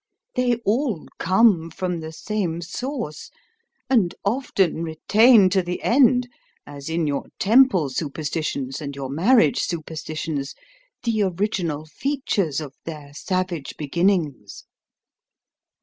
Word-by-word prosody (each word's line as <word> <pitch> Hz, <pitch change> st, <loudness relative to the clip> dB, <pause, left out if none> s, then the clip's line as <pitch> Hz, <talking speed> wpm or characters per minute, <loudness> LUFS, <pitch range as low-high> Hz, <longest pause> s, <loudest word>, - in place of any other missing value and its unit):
They 250 Hz, -1 st, +2 dB
all 220 Hz, -, 0 dB
come 185 Hz, -2 st, +3 dB
from 180 Hz, +1 st, -3 dB
the 160 Hz, 0 st, -7 dB
same 175 Hz, -1 st, -3 dB
source, 240 Hz, -, -5 dB, 0.6 s
and 225 Hz, -10 st, +2 dB
often 200 Hz, -7 st, +1 dB
retain 205 Hz, +7 st, +5 dB
to 190 Hz, -, +3 dB
the 180 Hz, 0 st, -5 dB
end, 250 Hz, -1 st, +4 dB, 0.4 s
as 140 Hz, +1 st, -8 dB
in 165 Hz, 0 st, 0 dB
your 145 Hz, -2 st, -1 dB
temple 220 Hz, -, +4 dB
superstitions 145 Hz, -2 st, -3 dB
and 140 Hz, -2 st, -5 dB
your 135 Hz, -1 st, -5 dB
marriage 170 Hz, -, +4 dB
superstitions, 155 Hz, -3 st, -4 dB, 0.5 s
the 230 Hz, -3 st, +1 dB
original 180 Hz, -5 st, -1 dB
features 200 Hz, -, -1 dB
of 145 Hz, -4 st, -7 dB
their 150 Hz, -3 st, -8 dB
savage 180 Hz, -2 st, -3 dB
beginnings. 155 Hz, -, -1 dB
170 Hz, 110 wpm, -23 LUFS, 155-215 Hz, 0.6 s, retain